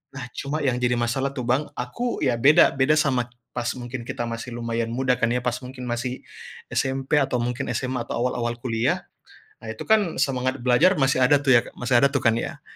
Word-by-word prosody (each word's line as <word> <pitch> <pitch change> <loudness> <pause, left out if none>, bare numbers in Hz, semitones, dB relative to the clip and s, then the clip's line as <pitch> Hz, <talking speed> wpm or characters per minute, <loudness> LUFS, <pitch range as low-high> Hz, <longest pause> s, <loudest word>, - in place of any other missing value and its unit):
Nah, 130 -2 -5
cuma 145 +3 -3
yang 125 -2 +1
jadi 120 0 +1
masalah 130 +3 -1
tuh, 125 - -3
Bang, 135 +5 +1
aku, 230 - -3
ya, 125 -3 +2
beda, 145 +6 +6
beda 135 +3 +3
sama 130 -4 +1 0.2
pas 120 0 -3
mungkin 120 -1 -7
kita 130 -2 -3
masih 115 +1 -6
lumayan 115 -1 -2
muda, 125 0 +1
kan, 120 - +2
ya, 125 +1 -1
pas 125 0 -1
mungkin 125 0 -9
masih 125 +2 -3 0.5
SMP 135 +2 0
atau 135 -2 0
mungkin 125 +2 -2
SMA 125 -2 -2
atau - - -3
awal-awal 120 -1 -1
kuliah. 115 -2 0 0.6
Nah, - - -9
itu, 110 - -8
kan, 215 -6 +3
semangat 130 -2 -1
belajar 125 +10 +4
masih 135 -1 +2
ada, 145 +3 +4
tuh, 130 -4 +6
ya - - 0
masih 120 0 +2
ada, 140 - +5
tuh, 140 - -1
kan, 115 -2 +4
ya. - - -6
125 Hz, 205 wpm, -24 LUFS, 120-135 Hz, 0.6 s, beda